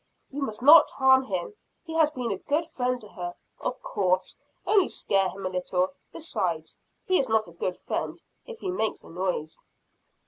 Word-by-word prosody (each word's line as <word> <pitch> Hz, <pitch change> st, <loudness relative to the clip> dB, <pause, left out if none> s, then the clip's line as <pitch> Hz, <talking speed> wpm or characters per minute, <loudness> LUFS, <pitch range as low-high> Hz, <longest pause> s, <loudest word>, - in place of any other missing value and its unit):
"You 285 Hz, +2 st, -5 dB
must 220 Hz, -4 st, -4 dB
not 300 Hz, +2 st, +9 dB
harm 265 Hz, 0 st, +4 dB
him 185 Hz, -, -3 dB, 0.3 s
he 325 Hz, -, -8 dB
has 320 Hz, -2 st, +4 dB
been 250 Hz, -6 st, -3 dB
a 195 Hz, -, -3 dB
good 300 Hz, +3 st, 0 dB
friend 250 Hz, -5 st, -1 dB
to 210 Hz, -, -10 dB
her." 175 Hz, -2 st, -6 dB, 0.2 s
"Of -, -, -3 dB
course 185 Hz, -1 st, 0 dB, 0.3 s
only 405 Hz, -4 st, +4 dB
scare 195 Hz, -1 st, +1 dB
him 195 Hz, 0 st, -8 dB
a -, -, 0 dB
little. 185 Hz, 0 st, -1 dB, 0.2 s
Besides, 170 Hz, -, -3 dB, 0.3 s
he 370 Hz, -, +4 dB
is 265 Hz, -, 0 dB
not 220 Hz, -2 st, +2 dB
a -, -, -12 dB
good 175 Hz, +2 st, -3 dB
friend, -, -, -4 dB, 0.3 s
if 475 Hz, -2 st, -8 dB
he 375 Hz, -, -2 dB
makes 220 Hz, -, -1 dB
a -, -, -14 dB
noise." 175 Hz, -3 st, -3 dB
220 Hz, 185 wpm, -27 LUFS, 185-290 Hz, 0.3 s, not